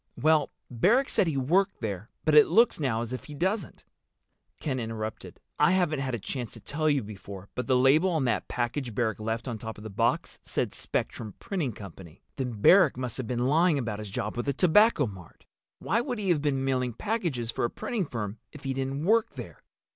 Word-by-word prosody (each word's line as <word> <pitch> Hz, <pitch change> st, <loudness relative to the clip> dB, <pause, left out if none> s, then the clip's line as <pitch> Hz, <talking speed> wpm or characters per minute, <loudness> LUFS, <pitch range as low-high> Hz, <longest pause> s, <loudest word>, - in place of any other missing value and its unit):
"Well, 155 Hz, -2 st, +3 dB, 0.2 s
Barrack 230 Hz, -, +3 dB
said 185 Hz, -, +3 dB
he 155 Hz, -4 st, -1 dB
worked 180 Hz, +9 st, +2 dB
there, 105 Hz, -1 st, -4 dB, 0.2 s
but 155 Hz, -, +3 dB
it 150 Hz, 0 st, +8 dB
looks 230 Hz, -4 st, +4 dB
now 125 Hz, -6 st, 0 dB
as 120 Hz, +1 st, -6 dB
if 130 Hz, -, -6 dB
he 150 Hz, -, -9 dB
doesn't." 190 Hz, +3 st, -2 dB, 0.7 s
Ken 130 Hz, -4 st, -2 dB
interrupted. 110 Hz, -1 st, -5 dB, 0.2 s
"I 150 Hz, +4 st, +5 dB
haven't 175 Hz, -6 st, +1 dB
had 130 Hz, -2 st, -2 dB
a -, -, -5 dB
chance 120 Hz, +3 st, -5 dB
to -, -, -9 dB
tell 155 Hz, +1 st, -1 dB
you 140 Hz, -4 st, +2 dB
before, 100 Hz, -2 st, -9 dB
but 125 Hz, -, -4 dB
the 130 Hz, -, +3 dB
label 140 Hz, +8 st, +4 dB
on 160 Hz, -6 st, 0 dB
that 120 Hz, -, 0 dB
package 120 Hz, -1 st, -3 dB
Barrack 110 Hz, -2 st, 0 dB
left 110 Hz, +2 st, -3 dB
on 115 Hz, -3 st, -4 dB
top 110 Hz, 0 st, -7 dB
of 105 Hz, -, -11 dB
the 110 Hz, -, -7 dB
box 100 Hz, -, 0 dB
said -, -, -1 dB
Spectrum 110 Hz, -3 st, -4 dB
Printing 165 Hz, -, -3 dB
Company." 95 Hz, -4 st, -12 dB
"Then 125 Hz, -6 st, -4 dB
Barrack 180 Hz, -, +6 dB
must 125 Hz, -3 st, -3 dB
have 130 Hz, -4 st, -4 dB
been 120 Hz, 0 st, -1 dB
lying 160 Hz, +3 st, +3 dB
about 115 Hz, -6 st, -3 dB
his 105 Hz, -1 st, -6 dB
job 105 Hz, +2 st, -3 dB
with 120 Hz, -, -3 dB
the 140 Hz, -, +2 dB
Tobacco 180 Hz, -, +4 dB
Mart. 95 Hz, -6 st, -11 dB, 0.3 s
Why 225 Hz, +7 st, 0 dB
would 245 Hz, -1 st, -3 dB
he 200 Hz, -3 st, -2 dB
have 165 Hz, -5 st, +3 dB
been 135 Hz, -2 st, 0 dB
mailing 125 Hz, -2 st, 0 dB
packages 165 Hz, -, -2 dB
for -, -, -3 dB
a 120 Hz, -, +2 dB
printing 215 Hz, -9 st, -3 dB
firm 110 Hz, -4 st, -5 dB
if 150 Hz, -, -12 dB
he 135 Hz, -1 st, -1 dB
didn't 135 Hz, +3 st, -3 dB
work 225 Hz, +3 st, +2 dB
there?" -, -, -9 dB
130 Hz, 215 wpm, -28 LUFS, 115-160 Hz, 0.7 s, it